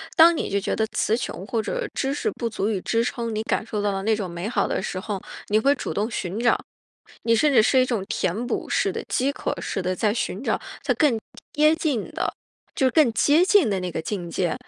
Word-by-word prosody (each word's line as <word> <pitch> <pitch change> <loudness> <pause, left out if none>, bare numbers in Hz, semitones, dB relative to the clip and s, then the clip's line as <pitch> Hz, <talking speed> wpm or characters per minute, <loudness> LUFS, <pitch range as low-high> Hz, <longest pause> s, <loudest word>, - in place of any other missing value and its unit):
当 335 +1 +7
你 - - -2
就 200 0 +1
觉 - - -2
得 220 - +1
词 220 - 0
穷 200 -5 -5
或 225 -2 0
者 - - -3
知 270 0 -1
识 435 - -1
不 235 -2 -3
足 210 -1 -1
以 195 -4 -1
支 230 0 +1
撑 235 -2 -3
你 215 +1 -2
感 220 - -1
受 210 -3 -3
到 205 -1 +1
的 195 0 -2
那 220 +2 +2
种 195 -4 -4
美 170 +5 -4
好 205 -5 +1
的 - - -1
时 185 - -3
候， 195 -1 -4 0.3
你 215 +1 +4
会 275 +5 +4
主 - - -4
动 210 +4 -1
寻 195 -1 -3
找。 240 0 +3 0.7
你 230 - +3
甚 290 +4 +3
至 220 - +6
是 260 - +4
一 255 - +4
种 230 -6 -1
填 220 +8 -1
补 - - -2
式 - - +1
的 - - -4
饥 270 +2 +1
渴 - - -3
式 190 - -2
的 185 +1 -1
在 210 +1 +1
寻 230 -1 -3
找 - - 0 0.2
它 - - +2
更 285 -8 +3 0.4
接 305 +1 +5
近 295 -10 -1
的， - - -2 0.4
就 265 - +2
是 260 - +3
更 300 -8 +4
接 305 +10 +4
近 385 - +4
的 195 -2 0
那 180 0 -3
个 - - -3
境 175 -2 -4
界， 175 0 0
225 Hz, 270 characters per minute, -24 LUFS, 200-265 Hz, 0.7 s, 当